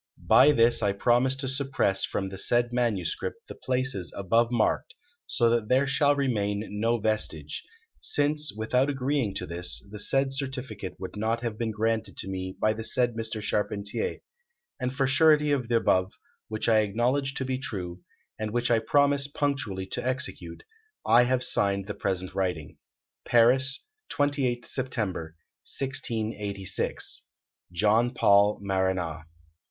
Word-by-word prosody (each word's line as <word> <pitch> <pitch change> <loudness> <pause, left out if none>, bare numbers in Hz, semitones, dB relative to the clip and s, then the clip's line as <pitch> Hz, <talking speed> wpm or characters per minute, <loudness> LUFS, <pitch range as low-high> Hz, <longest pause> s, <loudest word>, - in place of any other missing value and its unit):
By 150 - +7
this 115 -3 +4
I 100 -2 +1
promise 120 +5 +2
to 135 0 -4
suppress 130 -7 +1
from 95 -1 -3
the 95 0 -7
said 120 +3 +1
manuscript 120 - -2
the - - -7
places 130 -8 -2
above 115 +5 +2
marked, 120 - 0 0.3
so 120 - +2
that 115 -2 0
there 130 +2 +4
shall 145 +1 +3
remain 105 -6 -1
no 115 +2 +2
vestige; 105 -9 -1 0.4
since, 150 0 +1
without 125 +6 0
agreeing 135 -6 -1
to - - -3
this, 90 +3 -2
the 105 - -6
said 135 +5 +2
certificate 130 -8 -4
would 95 +2 -7
not 115 +3 -1
have 115 -3 -2
been 115 +1 -2
granted 110 +1 -1
to - - -3
me 95 0 -5
by 110 - +2
the 110 +1 -6
said 120 +2 +2
Mr. 110 -1 -4
Charpentier; 105 -1 -2 0.6
and 125 -1 -1
for 135 +1 0
surety 150 +2 +4
of 130 -4 0
the 120 - +1
above, 95 -4 +2 0.3
which 110 0 -3
I 110 -1 +5
acknowledge 125 +6 0
to 130 - -2
be 130 0 -2
true, 90 -8 -5 0.4
and 110 0 -2
which 120 +2 0
I 115 - +4
promise 140 +4 +2
punctually 135 -10 -2
to - - -3
execute, 130 - -4 0.4
I 120 +1 +6
have 125 0 +1
signed 100 -1 +1
the 105 - -5
present 95 -2 -2
writing. 90 -6 -3 0.4
Paris, 130 +4 +3 0.3
28th 140 -4 0
September, 105 - -3 0.4
1686. 110 -7 -2 0.5
"JOHN 110 +7 +2
PAUL 100 0 +4
MARANA." 95 -5 -1
115 Hz, 145 wpm, -27 LUFS, 100-130 Hz, 0.6 s, By